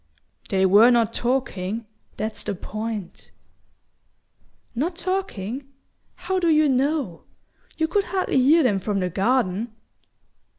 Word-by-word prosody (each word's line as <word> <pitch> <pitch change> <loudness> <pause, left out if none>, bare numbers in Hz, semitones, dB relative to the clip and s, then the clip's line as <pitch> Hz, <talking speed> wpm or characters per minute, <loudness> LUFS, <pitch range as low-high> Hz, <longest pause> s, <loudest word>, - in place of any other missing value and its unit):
"They 190 -1 +2
were 205 +5 +7
not 230 -2 +3
talking. 230 -4 -2 0.3
That's 220 0 -3
the 205 - -3
point 215 0 -6 0.8
" - - -41
"Not 325 +9 -1
talking? 280 - -3 0.5
How 380 0 -2
do 345 -2 +2
you 310 -1 +4
know? 270 - 0 0.5
You 320 - +1
could 400 +4 +1
hardly 370 -7 +1
hear 305 +5 +5
them 210 -7 +2
from 200 +1 -1
the 180 -1 -1
garden!" 220 +1 0
240 Hz, 125 wpm, -23 LUFS, 205-305 Hz, 0.8 s, were